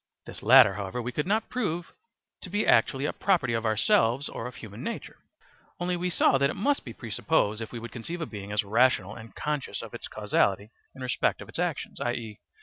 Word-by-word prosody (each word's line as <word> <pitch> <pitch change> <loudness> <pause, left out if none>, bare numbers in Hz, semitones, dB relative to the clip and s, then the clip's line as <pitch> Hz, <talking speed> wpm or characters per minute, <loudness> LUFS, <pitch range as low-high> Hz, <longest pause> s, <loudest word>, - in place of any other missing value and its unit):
This - - -9
latter, 130 -7 +8
however, 100 +4 -4
we 120 +1 -3
could 150 +6 -2
not 215 +3 +1
prove 175 -9 -3 0.5
to 185 - -8
be 205 +3 0
actually 135 +1 +3
a - - -1
property 170 -11 +1
of 115 0 0
ourselves 115 +4 +2
or 115 - -5
of 125 - -9
human 110 +1 -9
nature; 230 - -6 0.6
only 180 0 0
we 180 +1 -1
saw 135 -5 +3
that 140 0 +3
it - - -4
must 280 +7 +1
be 120 - -7
presupposed 110 -1 0
if 110 - -6
we 120 - -6
would 115 0 -7
conceive 165 +9 -5
a - - -1
being 100 -5 -8
as 105 0 +1
rational 105 -2 +2
and 115 -1 -11
conscious 150 -2 -3
of - - -9
its - - -5
causality 100 +2 0 0.2
in 130 - -8
respect 125 - 0
of - - -10
its - - -7
actions, - - -2
i.e. 115 -3 -3
125 Hz, 215 wpm, -28 LUFS, 110-160 Hz, 0.6 s, latter